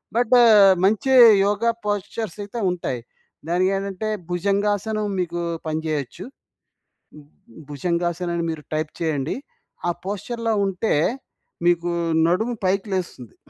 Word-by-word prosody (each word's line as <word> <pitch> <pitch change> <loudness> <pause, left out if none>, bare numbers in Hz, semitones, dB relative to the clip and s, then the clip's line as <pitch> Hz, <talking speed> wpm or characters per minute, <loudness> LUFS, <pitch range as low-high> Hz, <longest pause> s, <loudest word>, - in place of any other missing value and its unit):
But 245 +1 +1
ఆహ్, 205 -4 +7
మంచి 220 +6 +1 0.3
yoga 210 +3 +1 0.2
postures 205 -1 -3
అయితే 205 +4 -6
ఉంటాయి. 135 -8 -3 0.5
దానికేంటంటే, 195 +3 -1 0.2
భుజంగాసనం 205 +3 0
మీకు 175 -1 -2 0.3
పనిచేయొచ్చు. 155 0 -3 0.9
హ్మ్. 150 -1 -14 0.4
భుజంగాసనం 175 +3 -2
అని 170 - -1
మీరు 155 -2 -7
టైప్ 155 0 -2
చేయండి. 150 -3 -1 0.5
ఆ - - +2
పోస్చర్‌లో 225 +3 -3
ఉంటే 195 +3 -1 0.7
మీకు 175 0 +2 0.4
నడుము 220 +8 0
పైకి 195 +3 0
లేస్తుంది. 170 - -5
185 Hz, 105 wpm, -22 LUFS, 170-210 Hz, 0.9 s, ఆహ్